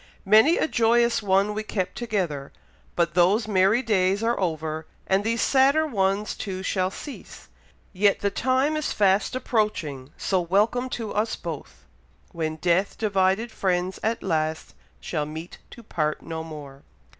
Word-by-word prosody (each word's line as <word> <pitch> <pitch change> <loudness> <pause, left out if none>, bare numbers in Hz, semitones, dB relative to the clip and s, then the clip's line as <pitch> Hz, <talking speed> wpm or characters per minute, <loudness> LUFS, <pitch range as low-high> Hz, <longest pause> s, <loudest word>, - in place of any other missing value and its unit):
Many 220 - +6
a - - +1
joyous 235 -2 +2
one 200 +1 +2
we 215 - -2
kept 190 -4 -3
together, 180 -12 -3 0.4
but 170 -1 +1
those 195 +5 +3
merry 200 +4 +3
days 195 -2 +1
are 235 +1 +1
over, 160 -3 -2 0.2
and 190 +1 +1
these 230 +1 0
sadder 275 +4 +4
ones 200 -5 0
too 190 -2 -5
shall 185 -1 0
cease; 275 +8 -10 0.4
yet 200 +1 +2
the 200 - 0
time 260 +7 +1
is 305 -1 -2
fast 195 +2 +2
approaching, 210 - -1
so 190 -2 0
welcome 210 +8 +1
to 225 -4 -4
us 220 +2 0
both, - - -8 0.5
'When 160 -3 -3
death 175 +4 +1
divided 205 +2 +1
friends 185 -2 -1
at 225 +1 -1
last 160 -3 -2 0.3
Shall 150 -3 -3
meet 160 +3 -8
to 235 - -13
part 155 -7 -2
no 160 -1 -5
more.'" 145 -4 -10
195 Hz, 150 wpm, -25 LUFS, 170-225 Hz, 0.5 s, Many